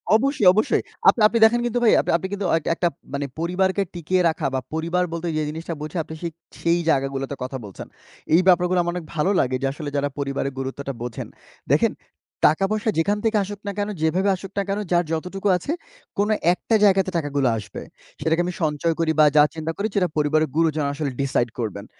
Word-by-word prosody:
অবশ্যই, 245 -4 +2
অবশ্যই। 215 +3 +2 0.3
আপনি 230 - +2
আপনি 230 - -1
দেখেন 240 +2 +4
কিন্তু 240 0 0
ভাই 225 - +6
আপনি - - -2
আপনি 190 - -5
কিন্তু 200 -1 -3
একটা 160 - -3
একটা 175 - +1 0.3
মানে 140 0 -2
পরিবারকে 190 +3 +1
টিকিয়ে 180 +2 0
রাখা 160 -2 -3
বা 130 - +1
পরিবার 170 +3 0
বলতে 170 +1 -3
যে - - +1
জিনিসটা 165 +2 -5
বুঝি 155 +3 -6
আপনি 160 - -9
সেই, 170 -1 -3 0.3
সেই 170 +1 +2
জায়গাগুলোতে 135 -1 0
কথা 130 +1 -4
বলছেন। 100 - -9 0.5
এই 180 - +6
ব্যাপারগুলা 180 0 +4
আমার 175 0 -2
অনেক 170 -3 -5
ভালো 165 +6 +2
লাগে 130 0 +1
যে 135 - +1
আসলে 150 -1 -6
যারা 145 0 0
পরিবারের 140 -1 -2
গুরুত্বটা 135 +1 -4
বোঝেন। 120 -1 -5 0.5
দেখেন - - +3 0.5
টাকা-পয়সা 200 +8 +1
যেখান 205 +5 +1
থেকে 220 -1 +2
আসুক 205 +1 -7
না - - -1
কেনো, 205 +1 -1
যেভাবে 185 +5 +2
আসুক 195 +1 -9
না 200 - +2
কেনো 200 +2 -1
যার 175 -1 +3
যতটুকু 185 +5 -3
আছে 280 - -5 0.5
কোনো 205 +2 +2 0.2
একটা 220 +5 -1
জায়গাতে 195 -2 +4
টাকাগুলা 145 -5 0
আসবে। 105 - -7 0.4
সেটাকে 160 +2 +2
আমি 180 - -3
সঞ্চয় 155 +2 0
করি 160 -1 +2
বা 155 - +8
যা 150 - +9
চিন্তা 160 0 -3
করি 205 +2 0
সেটা 180 -3 +3
পরিবারের 155 0 +2
গুরুজন 155 -3 +2
আসলে 145 -2 -3
ডিসাইড 125 -3 0
করবেন। 105 -2 -4
165 Hz, 200 wpm, -23 LUFS, 145-195 Hz, 0.5 s, যা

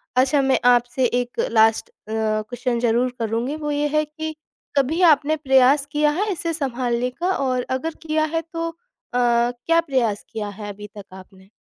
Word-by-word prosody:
अच्छा, 265 +3 +3
मैं 265 -1 +2
आपसे 245 +2 +1
एक 245 0 -2
लास्ट 225 -1 +3
अ, - - -32 0.2
क्वेश्चन 220 +2 -1
ज़रूर 240 +1 +1
करुँगी। 230 +5 -2
वो 295 -1 -4
ये 295 0 0
है 305 - +3
कि 315 +1 -6 0.4
कभी 290 +6 +1
आपने 295 +2 -1
प्रयास 270 0 +4
किया 295 0 +2
है 415 0 0
इसे 335 -2 -3
सँभालने 250 -4 -1
का, 345 +9 -2
और 255 -2 -1
अगर 265 +5 -2
किया 310 -1 0
है 325 - +1
तो 330 +1 -4
अ, 330 - -12 0.4
क्या 245 +6 +2
प्रयास 250 -9 -1
किया 215 -2 -4
है 205 -1 -6
अभी 210 +1 -10
तक 200 - -9
आपने? 190 +1 -15
255 Hz, 175 wpm, -22 LUFS, 235-300 Hz, 0.4 s, प्रयास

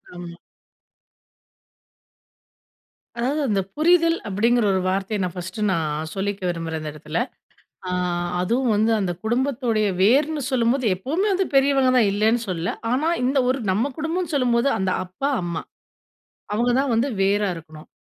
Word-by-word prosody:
ஆம். 175 -1 -8 2.8
அதாவது, 265 +6 0
அந்த 200 -2 +2
புரிதல் 335 +1 +4
அப்டிங்கிற 225 +4 +2
ஒரு 190 - +1
வார்த்தய, 195 +3 -1
நான் 180 - -3
ஃபர்ஸ்ட் 180 +3 -6
நான் 155 -2 -2
சொல்லிக்க 200 +1 -3
விரும்புறேன், 165 -2 -3
இந்த 155 - -5
இடத்துல. 155 +1 -5 0.7
ஆ, - - -2 0.5
அதுவும் 235 +6 +1
வந்து 220 +2 +2
அந்த 185 -3 -1
குடும்பத்தோடய 240 -3 0
வேர்ன்னு 290 +9 +3
சொல்லும்போது, 250 0 +1
எப்பவுமே 310 - -1
வந்து, 380 0 +1
பெரியவங்க 270 -1 +4
தான் 215 -5 +4
இல்லன்னு 220 +3 +2
சொல்லல. 180 -1 -2 0.2
ஆனா, 295 +6 +1 0.2
இந்த 270 +2 +1
ஒரு 260 +1 +1
நம்ம 230 +9 0
குடும்பனு 325 +1 -2
சொல்லும்போது, 245 -2 +2
அந்த 190 -1 0
அப்பா, 185 +10 -3
அம்மா. 170 -2 -3 0.9
அவங்க 240 +3 +1
தான் 275 -1 0
வந்து 240 +5 +2
வேரா 200 +1 +2
இருக்கணும். 155 -1 -12
225 Hz, 135 wpm, -23 LUFS, 185-270 Hz, 2.8 s, புரிதல்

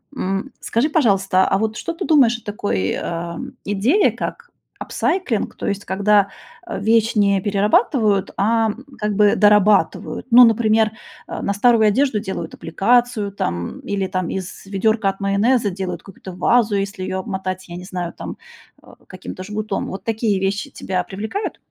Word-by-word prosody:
М. 195 +3 -3
Скажи, 240 +7 0
пожалуйста, 195 - +2
а 195 - +2
вот 220 +1 -2
что 335 - -4
ты 360 +2 -5
думаешь 260 -7 +4
о - - -26
такой, 100 - -2
а, 170 0 -4 0.3
идее, 220 - +2
как 475 0 -6 0.3
апсайклинг, 350 - -1
то - - -5
есть 200 0 -2
когда, 200 +1 +3 0.4
э, - - -4
вещь 225 +1 +2
не 200 -2 +3
перерабатывают, 205 +1 +2
а 225 +2 +2 0.3
как 210 -1 -2
бы 205 0 +4
дорабатывают? 210 +1 +3
Ну, 245 +2 +9
например, 220 -1 +3 0.4
э, - - -5
на 200 - -1
старую 220 +1 +4
одежду 255 +1 +2
делают 190 -5 -5
аппликацию, 220 +4 +1
там, 85 - -3
или 200 -1 -3 0.3
из 190 0 -7
ведёрка 200 +2 0
от 195 +1 -6
майонеза 205 +3 +2
делают 190 -1 -5
какую-то 190 -1 -11
вазу, 215 +3 +2
если 195 -1 -3
ее 185 - -3
обмотать, 190 -2 -5
я 175 - -7
не 180 - -9
знаю, 180 -2 -4
там, - - -7 0.5
э, - - -20 0.2
каким-то 185 0 -8
жгутом. 210 +1 -3
Вот 190 - -7
такие 220 -3 0
вещи 195 +1 -1
тебя 185 -1 -2
привлекают? 220 - -4
205 Hz, 160 wpm, -20 LUFS, 195-225 Hz, 0.5 s, Ну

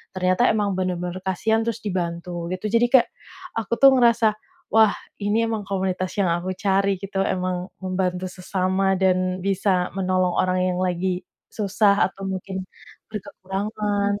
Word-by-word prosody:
ternyata 185 +5 +2
emang 205 -2 +1
benar-benar 180 0 -2
kasihan 220 +4 +1
terus 230 -1 -3
dibantu, 175 -2 -3
gitu. 210 +3 -4
Jadi 235 +1 +4
kayak 255 -3 +6 0.5
aku 225 +1 -2
tuh 275 0 +9
ngerasa, 235 -2 +4 0.5
wah 220 -2 +5 0.3
ini 210 +3 +1
emang 220 -2 -2
komunitas 185 -1 -1
yang 190 - +3
aku 175 +2 -2
cari 195 0 +2
gitu, 195 0 -4
emang 185 -1 -1 0.2
membantu 185 -1 -1
sesama 190 +1 0
dan 185 -1 +1
bisa 195 -2 +1
menolong 185 -1 +1
orang 185 0 +2
yang 180 - -3
lagi 180 0 -1 0.3
susah, 205 -1 +2
atau 195 +1 -11
mungkin, 190 0 -4 0.5
berkekurangan. 205 0 -2
190 Hz, 140 wpm, -23 LUFS, 185-205 Hz, 0.5 s, tuh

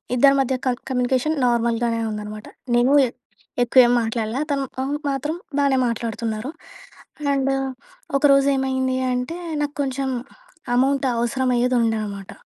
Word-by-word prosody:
ఇద్దరి 275 +3 +6
మధ్య 265 -1 +1
కన్ 250 -1 +1
కమ్యూనికేషన్ 255 +4 +1
నార్మల్‍గానే 235 -1 +1
ఉందనమాట. 210 0 -6 0.3
నేనూ 245 +4 +4
ఎ - - -5 0.5
ఎక్కువేం 245 0 +5
మాట్లాడలా. 225 +2 -2
తను 275 -1 0 0.2
అవును. 285 +2 -2
మాత్రం 285 +4 -2 0.2
బానే 275 -2 +3
మాట్లాడుతున్నారు. 230 +2 -3 0.8
అండ్ 275 -1 +1 0.7
ఒకరోజు 275 -1 +4
ఏమైందీ 260 -1 0 0.2
అంటే, 250 +8 -3 0.2
నాకు 295 0 -2
కొంచం 270 0 -2 0.6
అమౌంట్ 270 +2 +2
అవసరమఅయ్యేదుండె 240 -1 +1
అనమాట. 200 -2 -7
250 Hz, 115 wpm, -22 LUFS, 230-275 Hz, 0.8 s, ఇద్దరి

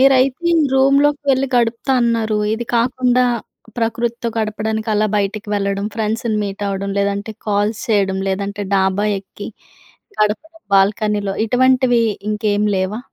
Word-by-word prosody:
మీరైతే 265 0 +4
ఈ - - +4 0.2
రూమ్‌లోకి 280 +2 +3
వెళ్ళి 270 0 +2
గడుపుతా 235 +3 +1
అన్నారు. 225 -2 +1 0.2
ఇది 235 +2 -4
కాకుండా, 250 +1 +2 0.5
ప్రకృతితో 235 +1 -1
గడపడానికి 220 +1 -2
అలా 210 +1 +2
బయటికి 205 +1 -2
వెళ్ళడం 200 0 -1
ఫ్రెండ్స్‌ని 220 0 -1
మీట్ 200 +1 -5
అవ్వడం 200 0 -3
లేదంటే, 200 +2 -1 0.2
కాల్స్ 210 +1 0
చేయడం, 195 -3 +1
లేదంటే 200 +1 -3
డాబా 190 +1 +1
ఎక్కి 200 +1 -10 0.7
గడప్ 210 +6 +1 0.3
బాల్కనీలో 205 0 +1
ఇటువంటివి 250 0 +3 0.3
ఇంకేమి 210 0 0
లేవా? 190 +4 -1
215 Hz, 125 wpm, -18 LUFS, 200-240 Hz, 0.7 s, మీరైతే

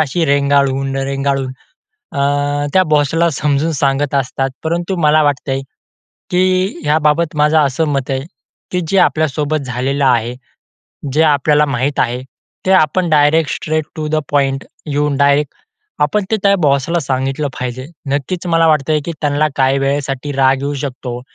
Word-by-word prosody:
अशी 160 +3 0
रेंगाळून, 140 -1 +1
रेंगाळून 135 -1 -1 0.6
अ, 140 - -5 0.6
त्या 185 - +6
बॉसला 160 +3 +2
समजून 150 +2 +1
सांगत 140 +1 +1
असतात. 135 0 -1
परंतु 170 +3 -1
मला 155 +1 +4
वाटतंय, 135 -2 0 0.7
की 185 +1 +1
ह्याबाबत 150 +1 +1
माझं 150 +1 +3
असं 150 +2 +1
मत 140 -2 -2
आहे, 130 0 -1 0.5
की 180 - -1
जे 195 - +2
आपल्यासोबत 155 -1 +1
झालेलं 135 +3 -1
आहे, 120 -1 +1 0.8
जे 155 +3 +3
आपल्याला 150 0 +3
माहीत 135 +4 -1
आहे, 125 +2 -1 0.4
ते - - +2
आपण 175 +1 +2
direct 150 +1 +3
straight 155 -1 -2
to 155 -1 -3
the - - +3
point 135 -2 +1 0.2
येऊन 145 -1 0
डायरेक्ट 140 0 +2 0.5
आपण 190 +7 +1
ते 220 - +2
त्या 200 0 +4
बॉसला 140 +4 +2
सांगितलं 135 +1 -2
पाहिजे. 125 +1 -4 0.2
नक्कीच 160 +6 -2
मला 165 -1 +3
वाटतंय, 155 0 +2
की 170 - -3
त्यांना 145 +1 +1
काही 135 0 +2
वेळेसाठी 140 0 -2
राग 135 -1 +3
येऊ 145 +1 -2
शकतो 125 -3 -5
145 Hz, 145 wpm, -16 LUFS, 135-155 Hz, 0.8 s, त्या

